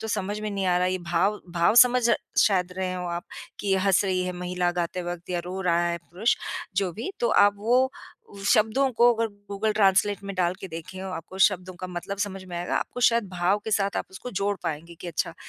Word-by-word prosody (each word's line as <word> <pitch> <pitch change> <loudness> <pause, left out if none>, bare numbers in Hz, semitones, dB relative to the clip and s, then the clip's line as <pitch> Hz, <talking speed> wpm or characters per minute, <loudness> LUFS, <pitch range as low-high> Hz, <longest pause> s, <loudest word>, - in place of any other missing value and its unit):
तो 220 - -5
समझ 205 0 -2
में 215 0 -3
नहीं 195 -1 -2
आ 180 -1 +3
रहा 180 - +1
है, 185 - 0
ये 185 - -1
भाव 175 +4 0
भाव 170 +5 +3
समझ 250 0 0 0.4
शायद 185 -4 +2
रहे 185 -1 -2
हों 180 -1 -4
आप 175 +2 -4 0.4
कि 205 - -4
ये 195 - +4
हँस 195 +1 +3
रही 185 -1 0
है 180 - -2
महिला 180 0 -1
गाते 175 +1 -2
वक़्त 175 0 -6
या 175 - 0
रो 185 +2 -5
रहा 170 -2 +2
है 170 - -1
पुरुष, 180 +7 0 0.4
जो 190 -2 +1
भी। 230 - -5
तो 235 - +2
आप 205 0 +5
वो 250 +5 +3 0.6
शब्दों 230 +5 +3
को 240 0 +7
अगर 230 0 0 0.2
गूगल 210 +2 0
ट्रांसलेट 200 -1 +3
में 195 - -5
डाल 180 -1 +1
के 190 - -7
देखें, 165 +3 -8
आपको 190 0 -7
शब्दों 185 -2 -4
का 185 - -4
मतलब 180 +2 -5
समझ 195 -2 -3
में 180 -2 -7
आएगा, 175 - -1
आपको 245 - -3
शायद 235 -2 +4
भाव 180 +2 +1
के 220 - -3
साथ 200 -1 +1
आप - - -1
उसको 190 +6 -8
जोड़ 200 0 -1
पाएँगे 165 +2 -4
कि - - -7
अच्छा, 165 - -2
190 Hz, 230 wpm, -26 LUFS, 180-205 Hz, 0.6 s, को